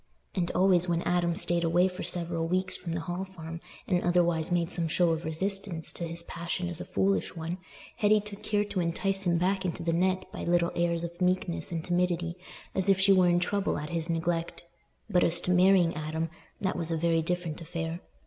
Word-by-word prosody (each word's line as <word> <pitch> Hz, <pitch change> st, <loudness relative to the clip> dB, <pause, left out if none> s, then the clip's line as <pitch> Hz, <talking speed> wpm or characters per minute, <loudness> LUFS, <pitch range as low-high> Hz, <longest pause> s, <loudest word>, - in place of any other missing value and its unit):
And 175 Hz, -3 st, 0 dB
always 180 Hz, -1 st, +4 dB
when 170 Hz, 0 st, +1 dB
Adam 175 Hz, -1 st, +1 dB
stayed 175 Hz, 0 st, +2 dB
away 175 Hz, +2 st, +4 dB
for 180 Hz, 0 st, -6 dB
several 170 Hz, -1 st, -1 dB
weeks 185 Hz, +2 st, 0 dB
from 170 Hz, -, -5 dB
the 165 Hz, -, -2 dB
Hall 175 Hz, +3 st, -3 dB
Farm, 165 Hz, -3 st, -8 dB, 0.3 s
and 180 Hz, -2 st, +2 dB
otherwise 175 Hz, -1 st, +2 dB
made 175 Hz, -1 st, +1 dB
some 170 Hz, -2 st, +1 dB
show 170 Hz, +1 st, +2 dB
of 160 Hz, 0 st, -2 dB
resistance 190 Hz, +1 st, -1 dB
to 170 Hz, -, -3 dB
his 170 Hz, +1 st, -4 dB
passion 170 Hz, +1 st, -4 dB
as 175 Hz, -1 st, -5 dB
a -, -, -6 dB
foolish 195 Hz, -1 st, 0 dB
one, 165 Hz, +2 st, -4 dB, 0.4 s
Hetty 210 Hz, 0 st, +4 dB
took 205 Hz, -1 st, -9 dB
care 205 Hz, -1 st, +1 dB
to 205 Hz, -2 st, -3 dB
entice 195 Hz, +3 st, 0 dB
him 170 Hz, -1 st, +3 dB
back 190 Hz, +2 st, +1 dB
into 170 Hz, -2 st, -3 dB
the 165 Hz, 0 st, 0 dB
net 185 Hz, +2 st, +1 dB
by -, -, -5 dB
little 175 Hz, 0 st, +2 dB
airs 170 Hz, -1 st, +1 dB
of 170 Hz, +1 st, -7 dB
meekness 180 Hz, -1 st, 0 dB
and 165 Hz, -1 st, -3 dB
timidity, 175 Hz, -1 st, 0 dB, 0.4 s
as 190 Hz, +1 st, +2 dB
if 195 Hz, -1 st, +4 dB
she 195 Hz, +1 st, +6 dB
were 185 Hz, -2 st, +5 dB
in 175 Hz, 0 st, +3 dB
trouble 200 Hz, +3 st, 0 dB
at 150 Hz, +2 st, -5 dB
his 165 Hz, 0 st, -2 dB
neglect. 165 Hz, +1 st, -1 dB, 0.4 s
But 180 Hz, -1 st, +3 dB
as 170 Hz, -, +2 dB
to 180 Hz, -, 0 dB
marrying 180 Hz, -1 st, +5 dB
Adam, 155 Hz, +1 st, -3 dB, 0.3 s
that 190 Hz, -3 st, -1 dB
was 170 Hz, -1 st, -2 dB
a 165 Hz, -, 0 dB
very 165 Hz, 0 st, +2 dB
different 170 Hz, -1 st, -3 dB
affair! 165 Hz, 0 st, -4 dB
175 Hz, 210 wpm, -29 LUFS, 165-185 Hz, 0.4 s, she